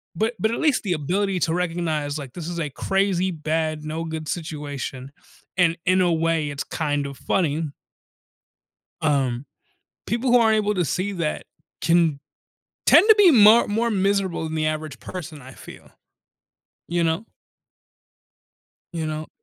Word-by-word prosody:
But 220 +2 0
but 220 +4 +1
at 235 - -2
least 300 -5 +2
the 190 -4 0
ability 185 +5 -1
to 160 - +1
recognize, 165 -4 -1
like, 135 -4 -8
this 170 -2 -7
is 175 -1 -4
a 150 -3 -2
crazy 190 +4 0
bad, 155 -1 -2
no 155 +2 -4
good 160 -1 -5
situation, 145 -5 -5 0.5
and 170 -2 +3
in 185 +1 +3
a 175 -1 +3
way, 160 -2 0
it's 140 -1 -4
kind 145 -3 -2
of 140 -1 -7
funny. 160 -3 0 1.4
Um, 135 -4 0 0.6
people 240 +4 0
who 245 - +6
aren't 220 -2 +4
able 210 0 +1
to 180 - +1
see 185 +6 -2
that 165 -5 -3 0.4
can 165 -3 +2 0.7
tend 375 - +7
to 440 - +9
be 400 -5 +7
mar 225 -1 +7
more 230 +3 0
miserable 195 -3 0
than 160 0 -4
the 155 0 0
average 155 -3 -4
person, 170 -5 -8
I 130 +1 -12
feel. - - -13 1.0
You 170 0 0
know? 165 +6 0 1.7
You 165 -1 -3
know 155 0 -5
165 Hz, 155 wpm, -23 LUFS, 155-195 Hz, 1.7 s, to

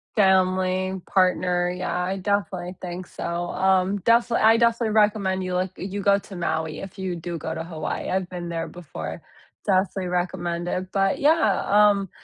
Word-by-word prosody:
Family, 185 -1 +2
partner, 180 -1 +2
yeah, 180 0 -2
I 190 +2 -2
definitely 185 -2 -2
think 180 0 -6
so. - - -8 0.3
Um, 190 +1 +2
defini 235 +3 +3
I 225 +1 +6
definitely 230 -2 +2
recommend 205 -3 +2
you 180 0 -3
like, 185 0 -1
you 200 +2 -5
go 200 0 +4
to 195 - -11
Maui 160 -2 -2
if 195 0 -9
you 185 -2 -2
do 170 0 -5
go 160 +1 -4
to 160 - -4
Hawaii. 160 -2 -4
I've 185 -1 -1
been 175 -1 -6
there 165 -1 -3
before. 80 - -7 0.4
Definitely 190 -1 +1
recommend 175 -1 -2
it. 185 +1 -3
But 195 -1 +1
yeah, 290 - +3
um, 205 -2 +4
185 Hz, 165 wpm, -24 LUFS, 175-200 Hz, 0.4 s, I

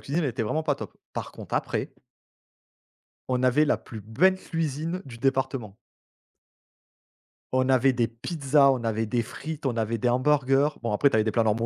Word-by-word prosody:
cuisine 155 +6 -1
elle 140 - 0
était 120 0 -3
vraiment 155 +9 -1
pas 150 -2 +1
top. - - -9 0.2
Par - - -5
contre - - -8
après - - -2 1.4
on 125 -1 +1
avait 130 +4 +4
la 150 - +2
plus 110 -4 -10
belle 140 - +3
cuisine 165 +1 -3
du 120 -3 -10
département! 130 -5 -1 1.8
On 130 0 +1
avait 130 0 +4
des 120 -2 +1
pizzas, 140 +4 +2
on 130 -3 -2
avait 115 0 0
des 120 +2 0
frites, 155 +6 -7
on 125 -3 0
avait 115 0 -1
des 120 +2 +1
hamburgers. 135 +2 +3
Bon, 120 - -2
après, 125 +7 +3
tu - - -1
avais 110 - +4
des 110 - 0
plats 115 +2 +2
normaux 110 +1 +1
130 Hz, 185 wpm, -26 LUFS, 115-145 Hz, 1.8 s, avait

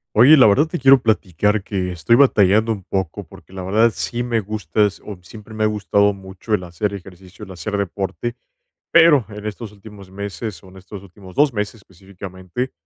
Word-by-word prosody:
Oye, 135 +8 +7
la 130 - +7
verdad, 135 +10 +4
te 175 - -4
quiero 135 0 +5
platicar 105 -1 0
que 95 -2 -3
estoy 90 +7 +2
batallando 110 -4 +4
un 100 -3 -6
poco, 95 -3 -4
porque, - - -17
la 95 -1 -7
verdad, 110 +5 +2
sí 120 0 -3
me 120 -2 -1
gustas, 105 -1 -2
o 105 -3 -8
siempre 105 +5 -13
me 110 0 -2
ha - - +4
gustado 105 -1 +1
mucho 95 +3 -6
el 90 - -1
hacer 95 +4 -3
ejercicio, 95 +1 -12
el 95 - -14
hacer 95 +4 -4
deporte, 100 +4 -4 0.6
pero, 160 - +5
en 105 0 -9
estos 105 +1 -6
últimos 100 -2 -14
meses, 100 +1 -7
o - - -15
en 95 - -14
estos 95 +1 -11
últimos 95 -1 -15
2 145 -2 +3
meses 105 0 -3
específicamente, 95 +3 -8
100 Hz, 190 wpm, -20 LUFS, 95-110 Hz, 0.6 s, Oye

